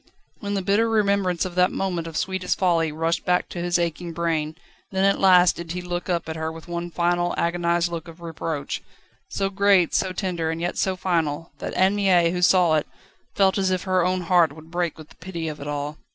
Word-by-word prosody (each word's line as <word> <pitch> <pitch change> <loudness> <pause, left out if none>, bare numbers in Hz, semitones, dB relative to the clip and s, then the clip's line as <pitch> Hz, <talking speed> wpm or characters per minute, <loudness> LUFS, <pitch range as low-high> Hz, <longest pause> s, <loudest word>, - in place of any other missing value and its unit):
When 205 -1 -3
the 195 - -1
bitter 205 +4 +2
remembrance 200 -5 +1
of 185 - -5
that 180 +1 +3
moment 175 -4 -2
of 160 -1 -5
sweetest 190 -1 -1
folly 170 -4 +2
rushed 165 +2 -1
back 180 0 +1
to 175 - -6
his 175 0 +1
aching 170 0 -3
brain, 160 -2 -1 0.4
then 190 0 0
at 195 - +3
last 180 -2 +5
did 170 -1 -6
he 180 - -4
look 175 +1 -4
up 170 -2 -1
at 160 - -4
her 160 0 -3
with 160 +1 -11
one 175 0 -4
final, 175 +1 0
agonised 170 0 +1
look 170 0 -5
of 165 0 -12
reproach, 165 -3 -4 0.5
so 195 -1 -2
great, 200 -3 +3
so 190 - +1
tender, 180 -4 -2
and 160 0 -3
yet 175 +1 -2
so 190 -2 +1
final, 165 -4 -1
that - - -5
Anne 190 +2 +3
Mie, 180 -4 +3
who 180 0 -2
saw 180 -2 +4
it, 150 - -2 0.5
felt 195 0 +3
as 190 -1 +1
if 185 -1 -1
her 185 -2 +1
own 185 +1 0
heart 170 -3 +3
would 160 +1 -14
break 175 -2 -2
with 155 -1 -12
the - - -18
pity 170 -2 -5
of 155 -1 -5
it 145 - -6
all. 145 +1 -4
175 Hz, 225 wpm, -23 LUFS, 165-185 Hz, 0.5 s, last